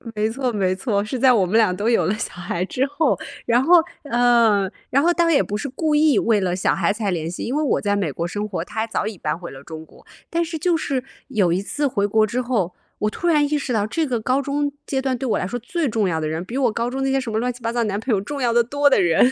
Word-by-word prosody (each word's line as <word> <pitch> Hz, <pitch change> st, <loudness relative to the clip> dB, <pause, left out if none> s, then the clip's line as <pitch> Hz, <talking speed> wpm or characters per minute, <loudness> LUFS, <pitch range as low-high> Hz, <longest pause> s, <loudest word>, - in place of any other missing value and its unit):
没 215 Hz, +1 st, +1 dB
错 250 Hz, +1 st, -2 dB
没 190 Hz, -3 st, 0 dB
错， 205 Hz, -1 st, -1 dB
是 230 Hz, +5 st, -4 dB
在 260 Hz, +1 st, +5 dB
我 205 Hz, -6 st, +3 dB
们 210 Hz, +5 st, +1 dB
俩 210 Hz, -5 st, +3 dB
都 205 Hz, +4 st, -2 dB
有 235 Hz, -, +3 dB
了 195 Hz, -, +1 dB
小 225 Hz, -, -5 dB
孩 175 Hz, 0 st, -3 dB
之 255 Hz, +7 st, -1 dB
后。 290 Hz, +3 st, +1 dB, 0.3 s
然 240 Hz, +2 st, +3 dB
后， 350 Hz, +4 st, +6 dB, 0.3 s
呃， 235 Hz, -6 st, +3 dB, 0.2 s
然 275 Hz, +2 st, +3 dB
后 345 Hz, +2 st, +3 dB
当 340 Hz, -1 st, +2 dB
然 330 Hz, -, +3 dB
也 -, -, +5 dB
不 205 Hz, -, -4 dB
是 265 Hz, +6 st, -3 dB
故 305 Hz, +2 st, 0 dB
意 300 Hz, -6 st, +4 dB
为 220 Hz, -3 st, +2 dB
了 180 Hz, -1 st, 0 dB
小 185 Hz, -, +1 dB
孩 185 Hz, 0 st, +1 dB
才 210 Hz, -1 st, -2 dB
联 165 Hz, -3 st, -2 dB
系， -, -, -5 dB
因 255 Hz, -, -2 dB
为 305 Hz, -, +1 dB
我 285 Hz, -, +1 dB
在 205 Hz, -1 st, +1 dB
美 185 Hz, -7 st, -1 dB
国 170 Hz, +5 st, -3 dB
生 205 Hz, +3 st, -3 dB
活， 180 Hz, -5 st, -4 dB
她 220 Hz, -, -4 dB
还 225 Hz, -, -2 dB
早 215 Hz, -, -2 dB
已 215 Hz, -4 st, -6 dB
搬 150 Hz, 0 st, -2 dB
回 175 Hz, -1 st, -8 dB
了 135 Hz, +1 st, -11 dB
中 160 Hz, 0 st, -9 dB
国， -, -, -20 dB, 0.2 s
但 335 Hz, 0 st, 0 dB
是 330 Hz, 0 st, -4 dB
就 350 Hz, +2 st, +2 dB
是， 275 Hz, -5 st, -2 dB, 0.3 s
有 195 Hz, -9 st, +2 dB
一 185 Hz, -, 0 dB
次 285 Hz, +8 st, -1 dB
回 200 Hz, -5 st, 0 dB
国 215 Hz, +1 st, +2 dB
之 250 Hz, +4 st, -1 dB
后， 215 Hz, -8 st, -1 dB, 0.3 s
我 210 Hz, -, +1 dB
突 345 Hz, -, -4 dB
然 300 Hz, -3 st, +4 dB
意 300 Hz, +1 st, 0 dB
识 275 Hz, -3 st, -4 dB
到 215 Hz, -3 st, +1 dB
这 320 Hz, +7 st, -1 dB
个 245 Hz, -4 st, -1 dB
高 255 Hz, +5 st, +1 dB
中 285 Hz, +1 st, -1 dB
阶 265 Hz, -1 st, -1 dB
段 260 Hz, -2 st, -1 dB
对 265 Hz, -, -3 dB
我 -, -, +2 dB
来 -, -, -2 dB
说 245 Hz, -, -3 dB
最 320 Hz, +6 st, -2 dB
重 215 Hz, -4 st, 0 dB
要 160 Hz, -1 st, -1 dB
的 155 Hz, -, -2 dB
人， 160 Hz, +2 st, -3 dB
比 230 Hz, +7 st, -6 dB
我 255 Hz, -4 st, +2 dB
高 235 Hz, +2 st, -2 dB
中 265 Hz, +2 st, -4 dB
的 270 Hz, -, 0 dB
那 -, -, 0 dB
些 270 Hz, -, +2 dB
什 235 Hz, -4 st, -5 dB
么 220 Hz, -, 0 dB
乱 250 Hz, +2 st, -1 dB
七 245 Hz, -, -15 dB
八 230 Hz, 0 st, -1 dB
糟 240 Hz, 0 st, 0 dB
男 200 Hz, -1 st, -1 dB
朋 220 Hz, +2 st, -1 dB
友 195 Hz, -, +2 dB
重 275 Hz, +7 st, -5 dB
要 240 Hz, -1 st, +2 dB
得 235 Hz, -, +4 dB
多 285 Hz, +4 st, +2 dB
的 265 Hz, -, +4 dB
人， 175 Hz, +9 st, +4 dB
230 Hz, 330 characters per minute, -21 LUFS, 200-270 Hz, 0.3 s, 后